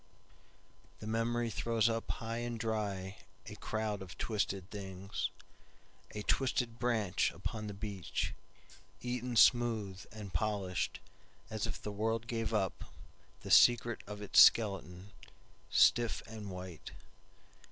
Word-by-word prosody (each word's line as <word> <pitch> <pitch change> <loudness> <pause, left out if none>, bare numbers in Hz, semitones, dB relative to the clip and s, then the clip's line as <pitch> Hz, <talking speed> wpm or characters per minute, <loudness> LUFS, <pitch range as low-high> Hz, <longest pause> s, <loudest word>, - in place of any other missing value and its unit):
The - - -9
memory 115 +1 0
throws 115 0 +1
up 115 0 -2
high 115 0 -3
and 120 -1 -4
dryA 105 -4 -2 0.5
crowd 110 -2 -2
of 95 -1 -9
twisted 100 -4 -2
things;A 100 +1 -8
twisted 125 -3 0
branch 110 -7 +1
upon 110 -1 -5
the 100 - -6
beachEaten 120 +4 -5
smooth, 110 -6 +4
and 105 -4 -8
polishedAs 95 0 -1 0.7
if - - -5
the 105 - -5
world 110 +2 -1
gave 115 -1 -2
upThe 100 -5 -5
secret 120 -1 +6
of 105 0 -7
its 105 - +7
skeleton, 95 -3 +4 0.6
Stiff 120 -2 +4
and 110 -2 -8
white. 90 -3 -8
110 Hz, 105 wpm, -34 LUFS, 100-115 Hz, 0.7 s, its